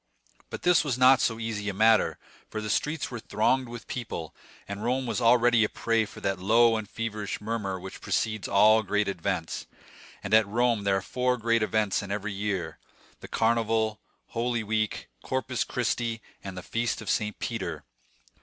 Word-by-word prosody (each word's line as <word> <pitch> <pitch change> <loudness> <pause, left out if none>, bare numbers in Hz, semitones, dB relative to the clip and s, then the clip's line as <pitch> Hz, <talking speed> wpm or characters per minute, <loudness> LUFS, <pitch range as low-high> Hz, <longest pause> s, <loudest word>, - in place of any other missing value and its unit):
But - - -7
this 180 -3 +5
was 135 -5 -1
not 130 0 +6
so 115 -1 0
easy 110 -2 -3
a 100 - -4
matter, 110 +2 +4 0.3
for 110 - -4
the 105 -1 -3
streets 150 -1 -1
were 120 - -5
thronged 125 +4 +1
with 120 -2 -8
people, 110 -10 -5 0.3
and 100 +1 -5
Rome 130 +2 0
was 125 - -2
already 120 0 +5
a 105 - +1
prey 115 -2 0
to - - -12
that 95 -1 -1
low 115 +4 +4
and 110 -2 -4
feverish 110 -3 -4
murmur 105 -3 -3
which 95 +1 -9
precedes 110 -2 -1
all 110 +2 +5
great 105 0 0
events; 90 -2 -3 0.6
and - - -3
at 110 -1 +6
Rome 115 -1 +1
there 100 -1 +3
are - - -2
four 125 +2 0
great 115 0 +1
events 105 -2 +1
in 100 - -8
every 105 +1 -3
year,—the 95 -5 -6
Carnival, 110 -1 +1 0.3
Holy 120 0 -1
Week, 110 0 -1
Corpus 130 -1 -1
Christi, 120 -1 -1 0.2
and 95 -2 -7
the 90 - -6
Feast 115 +3 -1
of 110 - -9
St. 105 -1 -1
Peter. 90 -10 -4
110 Hz, 175 wpm, -27 LUFS, 100-120 Hz, 0.6 s, not